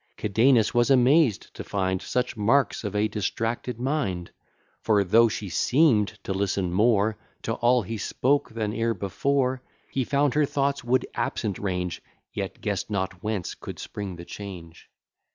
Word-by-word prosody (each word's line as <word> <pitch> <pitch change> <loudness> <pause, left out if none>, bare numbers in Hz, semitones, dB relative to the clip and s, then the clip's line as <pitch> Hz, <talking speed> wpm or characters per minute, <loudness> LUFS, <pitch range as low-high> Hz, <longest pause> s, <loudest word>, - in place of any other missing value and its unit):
Cadenus 110 +2 +3
was 120 +1 +3
amazed 130 - +3
to - - -7
find 95 -2 -1
Such 125 0 -1
marks 115 +4 +2
of 105 -1 -4
a 105 +1 +2
distracted 115 +3 -3
mind: 120 - -2 0.5
For, 105 -3 +3
though 115 +5 +5
she 105 -2 -4
seem'd 115 - +2
to 95 - -2
listen 95 -2 -1
more 105 +1 +2 0.2
To 115 - -1
all 120 +1 +3
he 110 +3 -5
spoke, 140 +6 +1
than 110 -2 -3
e'er 115 +1 0
before, 130 +6 0 0.3
He 135 - 0
found 140 +1 +1
her 150 0 +3
thoughts 140 0 0
would 125 +1 +1
absent 105 -5 -2
range, 90 -3 -3 0.3
Yet - - -5
guess'd - - -2
not 95 -3 -3
whence 105 -4 -3
could - - -9
spring 100 -3 -6
the 85 0 -10
change. 90 -5 -9
110 Hz, 155 wpm, -26 LUFS, 100-125 Hz, 0.5 s, though